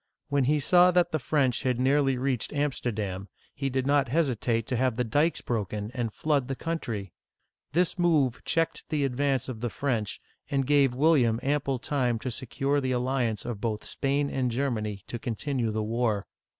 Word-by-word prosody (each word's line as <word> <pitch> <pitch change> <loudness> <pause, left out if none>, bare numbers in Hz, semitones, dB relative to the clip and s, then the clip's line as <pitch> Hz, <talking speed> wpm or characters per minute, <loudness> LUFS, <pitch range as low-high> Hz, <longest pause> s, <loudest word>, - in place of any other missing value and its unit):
When 140 -2 +2
he 150 +3 +3
saw 175 +5 +5
that 180 -1 +3
the 155 - 0
French 130 -2 +1
had 125 -2 0
nearly 135 0 +3
reached 130 -2 -1
Am'sterdam, 110 -9 -2 0.3
he 135 -1 -2
did 130 0 -1
not 140 -1 +3
hesitate 120 -5 0
to 130 - -2
have 125 -1 +1
the 125 - 0
dikes 145 +8 +1
broken 105 -2 -3
and 120 -3 -2
flood 145 +1 0
the 135 - -2
country! 115 - -4 0.6
This 180 +3 +1
move 150 -8 +2
checked 165 0 -1
the 150 -2 +1
advance 135 0 0
of 120 -4 -6
the 120 - -1
French, 115 -4 -2 0.3
and 135 -2 +1
gave 140 -2 +3
William 130 -6 +3
ample 140 -1 0
time 125 -2 0
to 125 +3 -4
secure 135 +4 -1
the 130 -1 0
alliance 125 -3 0
of 115 -4 -4
both 110 -2 -2
Spain 140 +1 0
and 130 -2 0
Germany 110 -6 -2
to 120 - -6
continue 125 0 -2
the 110 0 -1
war. 110 -2 0
130 Hz, 175 wpm, -28 LUFS, 115-145 Hz, 0.6 s, saw